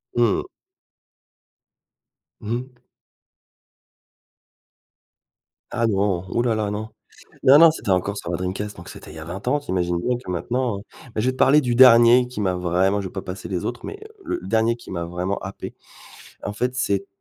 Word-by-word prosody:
Mmh. 120 -3 +2 2.0
Mmh 110 +2 -4
mh. 125 -1 -13 2.9
Ah 115 -1 +1
non, 100 -3 0
ouh 120 - 0
là 120 -2 +1
là, 105 -2 -1
non. 110 +1 -4 0.5
Non, 140 +3 +8
non, 165 -1 +8
c'était 105 -10 -3
encore 100 +3 0
sur 85 - -5
ma 85 - -1
Dreamcast, 95 +3 -4
donc 85 - -11
c'était - - -11
il - - -12
y 80 - -8
a 80 - -8
20 95 +7 -7
ans, 145 +3 +2
tu 145 - -19
imagines 90 -1 0
bien 125 +3 0
que 125 - -11
maintenant, 120 +4 -2
heu, - - -10 0.3
beh, 110 - 0
je 125 - 0
vais - - +3
te 130 - -12
parler 145 +3 +5
du 120 -3 -1
dernier 125 0 +7
qui 125 -4 -6
m'a 95 -2 0
vraiment 90 +3 +1
je 95 - -4
vais - - -12
pas 95 - -4
passer 90 +1 -7
les 90 -2 -3
autres 120 - -5
mais 405 - -7
heu, 435 -1 -16
le 350 +1 -2
dernier 115 +1 +2
qui 120 - -13
m'a 85 -2 -3
vraiment 90 +3 -3
happé, 95 0 -8 0.7
en 105 - -3
fait, 125 +4 -2
c'est 100 -6 0
t 100 - -18
105 Hz, 200 wpm, -22 LUFS, 95-125 Hz, 2.9 s, Non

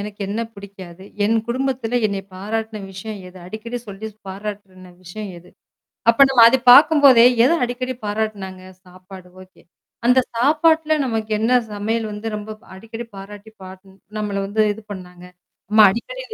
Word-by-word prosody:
எனக்கு 205 0 -8
என்ன 215 +3 -3
பிடிக்காது? 190 -2 -12 0.2
என் 225 +2 +2
குடும்பத்தில 245 -1 -2
என்னை 200 -1 -4
பாராட்டுன 220 +2 -4
விஷயம் 205 +1 -8
எது? 180 - -16
அடிக்கடி 225 +5 -6
சொல்லி 205 +2 -7 0.2
பாராட்டுன 190 -2 -8
விஷயம் 200 +3 -8
எது? 180 +1 -19 0.6
அப்ப 275 +4 +6
நம்ம 250 -3 +5
அது 265 +2 +2
பார்க்கும்போதே 280 -4 +7 0.2
எத - - +4
அடிக்கடி 255 +1 -4
பாராட்டுனாங்க? 205 -3 -4 0.2
சாப்பாடு 185 0 -14
ஓகே. 185 - -20 0.4
அந்த 250 +1 +5 0.2
சாப்பாட்ல 315 +5 +2
நமக்கு 225 -3 -3
என்ன 225 +3 0 0.2
சமையல் 220 +2 -2
வந்து 210 +2 -8
ரொம்ப 210 +1 -8 0.2
அடிக்கடி 225 +4 -9
பாராட்டி 205 +2 -11
பாட் 185 0 -11 0.4
நம்மள 210 -1 -3
வந்து 215 +2 0
இது 220 +1 -12
பண்ணாங்க? 180 -2 -10 0.4
நம்ம 215 +1 +3
அடிக்கடி - - -6
215 Hz, 145 wpm, -20 LUFS, 195-235 Hz, 0.6 s, பார்க்கும்போதே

